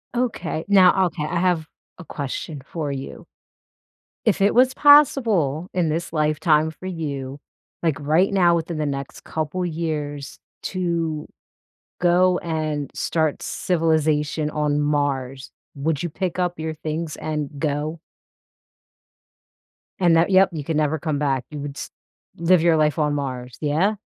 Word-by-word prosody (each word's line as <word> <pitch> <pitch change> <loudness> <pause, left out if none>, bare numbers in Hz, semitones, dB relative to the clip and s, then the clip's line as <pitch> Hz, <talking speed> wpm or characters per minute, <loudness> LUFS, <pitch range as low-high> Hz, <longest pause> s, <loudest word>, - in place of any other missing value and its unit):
Okay. 225 -10 -2
Now, 190 -1 +5
okay, 160 -2 -5
I 170 +3 -1
have 175 -3 +1 0.3
a 180 - -10
question 145 -1 -5
for 155 -3 -4
you. 135 0 -7 1.0
If 220 - +2
it 200 +1 +3
was 255 +1 +4
possible 225 - +4
in 175 -3 +1
this 165 +2 -3
lifetime 155 0 +2
for 160 +4 -12
you, 145 -6 -4 0.4
like, 160 -3 0
right 160 +6 +2
now 175 -3 +4
within 165 0 -3
the 155 - -1
next 140 -1 -5
couple 160 +4 -3
years, 155 -4 -4 0.3
to 170 -4 -2 0.7
go 180 +1 +4
and 155 -3 -3
start 160 -3 -1
civilization 155 -3 0
on 150 -1 0
Mars, 140 -3 -1 0.2
would 145 +1 -1
you 175 - -2
pick 180 +2 -3
up 180 -1 -1
your 160 0 -3
things 155 0 -4
and 150 -2 -3
go? 150 +2 -2 2.0
And 175 -2 +4
that 165 +3 +3
yep, 190 0 +5
you 155 -3 -4
can 160 +1 -2
never 155 +1 +1
come 155 -3 -2
back. 135 -4 0
You 150 -1 -7
would 140 -1 -6
s - - -6 0.5
live 170 0 +4
your 165 -1 +4
life 155 +1 +2
on 150 -1 +1
Mars. 130 -3 -4
Yeah? 160 +8 +1
160 Hz, 145 wpm, -22 LUFS, 150-175 Hz, 2.0 s, Now